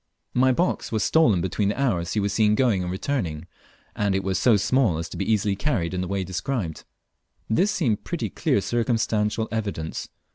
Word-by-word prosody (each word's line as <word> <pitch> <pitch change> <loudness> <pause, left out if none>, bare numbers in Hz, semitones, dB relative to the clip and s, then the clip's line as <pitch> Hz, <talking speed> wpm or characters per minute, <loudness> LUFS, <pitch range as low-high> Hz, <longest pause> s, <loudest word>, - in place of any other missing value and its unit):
My 130 +1 +4
box 175 +8 0
was 110 -2 0
stolen 115 - +4
between 100 +2 0
the 105 - -3
hours 90 -11 0
he 110 - +1
was 100 -1 0
seen 105 0 +3
going 115 -6 +2
and 90 0 -3
returning, 95 - -2 0.5
and 100 -2 +1
it 95 - 0
was 95 0 0
so 115 -4 +5
small 105 -2 +2
as 85 - -4
to - - -8
be 100 +3 -1
easily 105 -2 +1
carried 95 - -1
in 90 - -1
the 90 - -3
way 100 +1 -1
described. 95 - -3 0.6
This 180 - +2
seemed 130 - 0
pretty - - -3
clear 100 - +1
circumstantial 110 -2 0
evidence. 100 -8 -3
105 Hz, 190 wpm, -24 LUFS, 95-120 Hz, 0.6 s, so